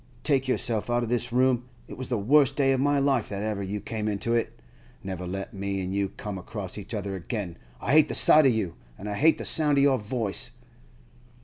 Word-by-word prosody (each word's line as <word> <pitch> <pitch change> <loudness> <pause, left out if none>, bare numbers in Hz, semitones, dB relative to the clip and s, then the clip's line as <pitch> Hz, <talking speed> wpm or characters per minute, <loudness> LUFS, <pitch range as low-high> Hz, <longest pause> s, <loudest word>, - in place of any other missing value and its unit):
Take 135 -3 +2
yourself 120 -3 0
out 120 0 +1
of 115 - -3
this 120 0 -1
room; 125 0 +2 0.2
it - - -8
was 130 - -6
the 120 - 0
worst 135 +6 +4
day 135 -2 +3
of 135 - +1
my 145 +1 +2
life 135 -5 +1
that 100 0 -4
ever 105 -2 -2
you 100 +2 -3
came 110 +1 -4
into 105 +3 -1
it. 115 - -1 0.4
Never 95 -2 -5
let 95 +2 -5
me 100 0 -3
an' 95 0 -3
you 100 0 0
come 100 -1 -6
across 95 0 -6
each 105 +2 -6
other 100 -2 -3
again. 95 -1 -4 0.2
I - - -2
hate 155 +1 +6
the - - -4
sight 155 -2 +6
of - - +5
you, 105 -7 -1 0.2
an' 105 - -8
I 105 - -2
hate 155 +9 +4
the - - -6
sound 150 -3 +2
of 140 - +5
your 135 -2 +4
voice! 110 -1 -3
110 Hz, 230 wpm, -26 LUFS, 100-130 Hz, 0.4 s, hate